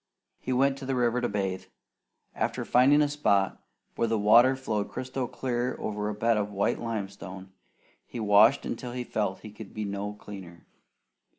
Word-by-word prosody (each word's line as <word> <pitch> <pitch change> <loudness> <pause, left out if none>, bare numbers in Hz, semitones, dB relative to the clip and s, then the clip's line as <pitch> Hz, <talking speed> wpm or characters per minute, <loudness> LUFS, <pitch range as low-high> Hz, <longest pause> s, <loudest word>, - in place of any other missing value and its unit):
He 130 - -4
went 135 +2 +2
to 135 - -7
the 135 - 0
river 120 0 +1
to 120 - 0
bathe. 95 -2 -2 0.7
After - - -2
finding 140 +4 +5
a - - +2
spot 100 -10 +1 0.3
where 115 - +1
the 115 0 +1
water 115 +5 +6
flowed 110 -6 -2
crystal 130 0 -4
clear 125 0 -2
over 105 0 -3
a 105 - -4
bed 115 +1 +2
of 105 -1 -1
white 100 -1 0
limestone, 100 -4 -6 0.6
he 120 - -7
washed 110 +4 +5
until 125 -2 -5
he 125 0 -3
felt 105 -5 -1
that - - -23
he 105 - -12
could 105 -1 -11
be 110 -1 -3
no 100 +1 -4
cleaner. 95 -5 -11
110 Hz, 180 wpm, -28 LUFS, 100-125 Hz, 0.7 s, water